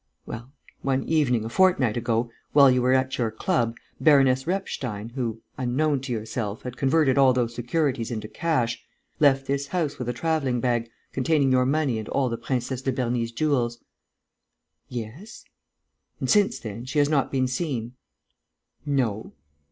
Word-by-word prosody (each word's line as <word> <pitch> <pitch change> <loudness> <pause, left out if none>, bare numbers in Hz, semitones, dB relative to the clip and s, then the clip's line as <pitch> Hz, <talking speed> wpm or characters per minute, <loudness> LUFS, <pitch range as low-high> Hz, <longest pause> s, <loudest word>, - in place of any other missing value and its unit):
"Well, 120 +3 -8 0.3
one 135 -1 0
evening, 130 -8 +1
a - - -4
fortnight 160 - +3
ago, 115 0 0 0.2
while 140 -2 +7
you 125 0 +2
were 125 +1 +3
at 130 0 +1
your 115 -2 +1
club, 115 0 -1 0.2
Baroness 135 -3 +4
Repstein, 125 - -3
who, 115 -3 -4 0.2
unknown 135 +3 +1
to 135 -1 -6
yourself, 110 -2 -3
had 125 -1 -6
converted 135 +1 +3
all 135 -2 +6
those 120 -2 0
securities 125 -1 -1
into 110 -3 -4
cash, 120 -7 -1 0.4
left 135 -2 +4
this 140 +1 -1
house 150 -4 -2
with 125 -1 -3
a - - -1
travelling 135 -3 0
bag, 120 -1 0 0.2
containing 140 0 +2
your 130 0 +3
money 140 -5 +1
and 110 - -7
all 135 -2 +1
the 115 - -2
Princesse 130 0 -2
de 135 - 0
Berny's 120 -2 -1
jewels?" 120 -3 0 1.1
"Yes." 125 - -8 0.7
"And, - - -2
since 205 -1 +4
then, 115 +2 -7
she 140 +3 -4
has 145 -1 +4
not 145 -3 +1
been 130 -1 +1
seen?" 125 -3 -3 0.9
"No." 130 -7 -1
130 Hz, 160 wpm, -25 LUFS, 120-140 Hz, 1.1 s, while